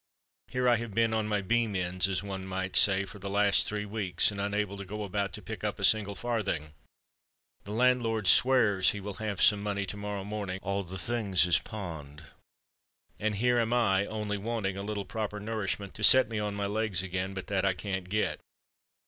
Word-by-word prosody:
Here 125 Hz, 0 st, -2 dB
have 115 Hz, -2 st, +1 dB
I -, -, -13 dB
been 115 Hz, -1 st, +2 dB
on 110 Hz, -1 st, 0 dB
my 105 Hz, -2 st, -1 dB
beam 115 Hz, +1 st, +1 dB
ends, 90 Hz, +1 st, 0 dB
as 95 Hz, 0 st, -1 dB
one 95 Hz, -1 st, -6 dB
may 95 Hz, 0 st, -3 dB
say, 95 Hz, -1 st, +5 dB
for 100 Hz, -, -11 dB
the 100 Hz, +1 st, -6 dB
last 100 Hz, 0 st, +3 dB
three 105 Hz, 0 st, -3 dB
weeks, 100 Hz, -4 st, 0 dB
and 100 Hz, -1 st, -5 dB
unable 100 Hz, 0 st, -1 dB
to 100 Hz, -, -6 dB
go 105 Hz, +2 st, -6 dB
about 100 Hz, 0 st, -2 dB
to 105 Hz, -, -8 dB
pick 110 Hz, -1 st, -7 dB
up 105 Hz, -1 st, -2 dB
a 100 Hz, -, -7 dB
single 100 Hz, 0 st, +3 dB
farthing—the 100 Hz, -4 st, -7 dB
landlord 115 Hz, -2 st, +1 dB
swears 110 Hz, -5 st, +5 dB
he 105 Hz, -, -5 dB
will 100 Hz, +1 st, -6 dB
have 105 Hz, -3 st, -3 dB
some 105 Hz, -1 st, +5 dB
money 100 Hz, -1 st, -2 dB
to 100 Hz, -, -7 dB
morrow 105 Hz, -1 st, -4 dB
morning—all 100 Hz, -1 st, -4 dB
the 95 Hz, +2 st, -7 dB
things 100 Hz, -4 st, +2 dB
is 90 Hz, -, +5 dB
pawned—and 80 Hz, +3 st, -9 dB
here 120 Hz, +3 st, +2 dB
am 115 Hz, 0 st, 0 dB
I 100 Hz, -5 st, +2 dB
only 105 Hz, -1 st, -3 dB
wanting 105 Hz, -3 st, -2 dB
a 100 Hz, -, -5 dB
little 100 Hz, -1 st, -4 dB
proper 105 Hz, 0 st, -4 dB
nourishment 105 Hz, -2 st, -3 dB
to 110 Hz, -, -6 dB
set 130 Hz, +6 st, +7 dB
me 110 Hz, -2 st, -3 dB
on 105 Hz, -1 st, -3 dB
my 100 Hz, 0 st, -2 dB
legs 105 Hz, -2 st, -1 dB
again; 95 Hz, +1 st, -3 dB
but 95 Hz, -, -5 dB
that 100 Hz, -2 st, -1 dB
I 95 Hz, -1 st, +2 dB
can't 95 Hz, -1 st, -5 dB
get." 95 Hz, -6 st, -1 dB
100 Hz, 200 wpm, -29 LUFS, 95-110 Hz, -, set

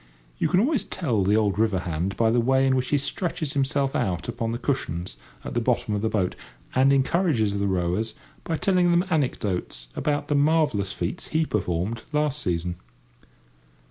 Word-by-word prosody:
You -, -, +1 dB
can 180 Hz, -, +3 dB
always 265 Hz, +4 st, +2 dB
tell 120 Hz, -, -1 dB
the 100 Hz, +3 st, +3 dB
old 105 Hz, -2 st, +1 dB
river 105 Hz, -5 st, +2 dB
hand 90 Hz, +3 st, -3 dB
by 115 Hz, -1 st, +3 dB
the 120 Hz, -, +3 dB
way 130 Hz, +3 st, +3 dB
in 130 Hz, -1 st, +3 dB
which 130 Hz, -1 st, 0 dB
he 145 Hz, -, +3 dB
stretches 155 Hz, +1 st, -2 dB
himself 140 Hz, 0 st, 0 dB
out 90 Hz, -3 st, -1 dB
upon 115 Hz, -1 st, -2 dB
the 115 Hz, -, -2 dB
cushions 90 Hz, -, -2 dB, 0.3 s
at -, -, -6 dB
the 120 Hz, -, +1 dB
bottom 115 Hz, -3 st, 0 dB
of 105 Hz, -, -1 dB
the 110 Hz, -, +1 dB
boat, 95 Hz, -5 st, 0 dB, 0.4 s
and 130 Hz, +2 st, +4 dB
encourages 135 Hz, -, +2 dB
the 100 Hz, -, +1 dB
rowers 95 Hz, +4 st, -1 dB, 0.3 s
by 165 Hz, -, -2 dB
telling 180 Hz, 0 st, +3 dB
them 175 Hz, +2 st, +3 dB
anecdotes 100 Hz, -, -1 dB
about 145 Hz, -1 st, -1 dB
the 145 Hz, -, 0 dB
marvellous 145 Hz, -9 st, +2 dB
feats 170 Hz, -, -4 dB
he 160 Hz, 0 st, +1 dB
performed 100 Hz, -, -2 dB
last 150 Hz, -1 st, 0 dB
season. 85 Hz, 0 st, -2 dB
120 Hz, 180 wpm, -25 LUFS, 100-145 Hz, 0.4 s, and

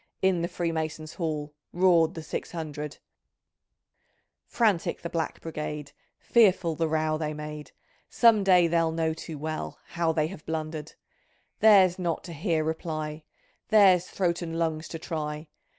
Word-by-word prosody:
In 190 Hz, -3 st, +3 dB
the 170 Hz, -, 0 dB
Freemason's 160 Hz, -2 st, -3 dB
Hall 150 Hz, -3 st, -3 dB, 0.2 s
Roared 170 Hz, -3 st, +3 dB
the 160 Hz, -, -6 dB
six 155 Hz, -, -5 dB
hundred! 150 Hz, -3 st, -5 dB, 1.5 s
Frantic 210 Hz, -8 st, +1 dB
the 170 Hz, -, -5 dB
Black 165 Hz, -1 st, -2 dB
Brigade, 150 Hz, -2 st, -5 dB, 0.3 s
Fearful 190 Hz, -7 st, +3 dB
the 165 Hz, +1 st, 0 dB
row 155 Hz, 0 st, 0 dB
they 155 Hz, -1 st, -3 dB
made, 150 Hz, 0 st, -7 dB, 0.4 s
Some 225 Hz, -4 st, +5 dB
day 180 Hz, -2 st, +5 dB
they'll 165 Hz, -1 st, +2 dB
know 160 Hz, 0 st, 0 dB
too 160 Hz, -1 st, -8 dB
well 155 Hz, +2 st, -4 dB
How 170 Hz, -1 st, 0 dB
they 155 Hz, -1 st, +1 dB
have 155 Hz, -2 st, -8 dB
blundered. 155 Hz, -1 st, -4 dB, 0.7 s
Theirs 195 Hz, -4 st, +6 dB
not 170 Hz, -3 st, -2 dB
to 170 Hz, -, -8 dB
hear 160 Hz, 0 st, 0 dB
reply. 155 Hz, -1 st, -3 dB, 0.5 s
Theirs 195 Hz, -5 st, +6 dB
throat 175 Hz, -2 st, -1 dB
and 165 Hz, -1 st, -4 dB
lungs 160 Hz, -1 st, -1 dB
to 165 Hz, -, -6 dB
try. 155 Hz, -2 st, -5 dB
160 Hz, 145 wpm, -27 LUFS, 155-175 Hz, 1.5 s, Theirs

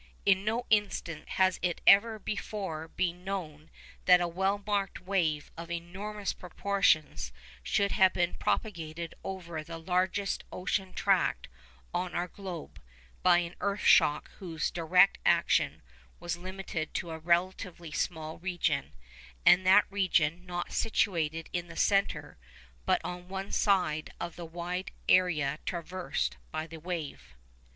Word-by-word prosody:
In 190 Hz, -1 st, +4 dB
no 230 Hz, +4 st, -1 dB
instance 200 Hz, -6 st, 0 dB
has 185 Hz, -1 st, +3 dB
it 175 Hz, -1 st, 0 dB
ever 220 Hz, +3 st, +6 dB
before 195 Hz, -6 st, -4 dB
been 175 Hz, +1 st, -2 dB
known 165 Hz, -6 st, -5 dB, 0.4 s
that 180 Hz, -1 st, +7 dB
a 175 Hz, -, 0 dB
well 190 Hz, +4 st, 0 dB
marked 200 Hz, -2 st, -1 dB
wave 170 Hz, -6 st, 0 dB
of 165 Hz, 0 st, -8 dB
enormous 195 Hz, +5 st, -4 dB
proportions 180 Hz, -, +1 dB, 0.3 s
should 200 Hz, -, +1 dB
have 190 Hz, -1 st, +5 dB
been 175 Hz, -1 st, 0 dB
propagated 170 Hz, -5 st, -2 dB
over 170 Hz, -5 st, -5 dB
the 165 Hz, +1 st, -7 dB
largest 185 Hz, +3 st, 0 dB
ocean 190 Hz, +1 st, -2 dB
tract -, -, +1 dB, 0.4 s
on 180 Hz, 0 st, -2 dB
our 175 Hz, +1 st, 0 dB
globe, 180 Hz, -4 st, -8 dB, 0.4 s
by 180 Hz, -1 st, +6 dB
an 175 Hz, 0 st, -2 dB
earth 200 Hz, 0 st, -1 dB
shock 150 Hz, +1 st, +5 dB
whose 165 Hz, -5 st, -2 dB
direct 180 Hz, +3 st, +4 dB
action -, -, +2 dB, 0.4 s
was 175 Hz, -, -3 dB
limited 185 Hz, -2 st, -5 dB
to 170 Hz, -2 st, -2 dB
a 160 Hz, -, -5 dB
relatively 175 Hz, 0 st, 0 dB
small 160 Hz, -1 st, -3 dB
region, 170 Hz, -5 st, -1 dB, 0.5 s
and 185 Hz, +1 st, +6 dB
that 195 Hz, +2 st, +7 dB
region 180 Hz, -3 st, +1 dB
not 175 Hz, 0 st, -4 dB
situated 165 Hz, -8 st, 0 dB
in 175 Hz, -1 st, -2 dB
the 165 Hz, -, -10 dB
centre, 195 Hz, -, +1 dB, 0.5 s
but -, -, +4 dB
on 180 Hz, +1 st, -6 dB
one 190 Hz, +1 st, -5 dB
side 180 Hz, -7 st, +1 dB
of 170 Hz, -1 st, -5 dB
the 175 Hz, -, -7 dB
wide 175 Hz, +3 st, -4 dB, 0.2 s
area 155 Hz, -6 st, +3 dB
traversed 180 Hz, +1 st, -3 dB
by 155 Hz, 0 st, -3 dB
the 165 Hz, 0 st, -10 dB
wave. 160 Hz, -, -6 dB
180 Hz, 135 wpm, -30 LUFS, 165-190 Hz, 0.5 s, that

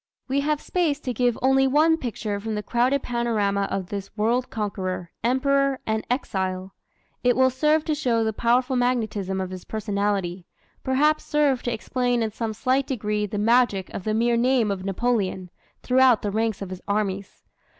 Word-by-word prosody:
We 275 Hz, +1 st, +1 dB
have 300 Hz, +1 st, 0 dB
space 320 Hz, -5 st, 0 dB
to 250 Hz, -, -3 dB
give 245 Hz, 0 st, +1 dB
only 270 Hz, 0 st, +4 dB
one 310 Hz, +4 st, +4 dB
picture 220 Hz, -7 st, -4 dB
from 220 Hz, +1 st, -4 dB
the 210 Hz, -, -3 dB
crowded 250 Hz, +5 st, +1 dB
panorama 210 Hz, -5 st, 0 dB
of 190 Hz, -2 st, -3 dB
this 200 Hz, -1 st, -5 dB
world 235 Hz, +4 st, +1 dB
conqueror, 185 Hz, -5 st, -4 dB
emperor, 275 Hz, +2 st, +2 dB
and 220 Hz, 0 st, -2 dB
exile. 190 Hz, -6 st, -2 dB, 0.5 s
It 245 Hz, -1 st, +4 dB
will 260 Hz, 0 st, +4 dB
serve 300 Hz, +4 st, +2 dB
to 315 Hz, -, 0 dB
show 245 Hz, -6 st, +1 dB
the 220 Hz, 0 st, -1 dB
powerful 245 Hz, +4 st, +1 dB
magnetism 220 Hz, -6 st, 0 dB
of 185 Hz, -1 st, -3 dB
his 185 Hz, -1 st, -7 dB
personality 200 Hz, -4 st, -2 dB, 0.4 s
perhaps 300 Hz, +4 st, +2 dB
serve 290 Hz, -4 st, +1 dB
to 240 Hz, -, -2 dB
explain 245 Hz, +1 st, 0 dB
in 220 Hz, -, -2 dB
some 220 Hz, 0 st, -3 dB
slight 260 Hz, +5 st, 0 dB
degree 210 Hz, -4 st, -1 dB
the 205 Hz, -, -4 dB
magic 215 Hz, -3 st, +2 dB
of -, -, -5 dB
the 215 Hz, +1 st, -1 dB
mere 235 Hz, +1 st, +2 dB
name 240 Hz, -3 st, +2 dB
of 190 Hz, -2 st, -4 dB
Napoleon, 195 Hz, -3 st, -1 dB, 0.3 s
throughout 255 Hz, -3 st, +4 dB
the 205 Hz, -, -1 dB
ranks 220 Hz, -1 st, -1 dB
of 190 Hz, -, -8 dB
his 185 Hz, -, -7 dB
armies. 200 Hz, -1 st, -2 dB
230 Hz, 175 wpm, -24 LUFS, 200-260 Hz, 0.5 s, only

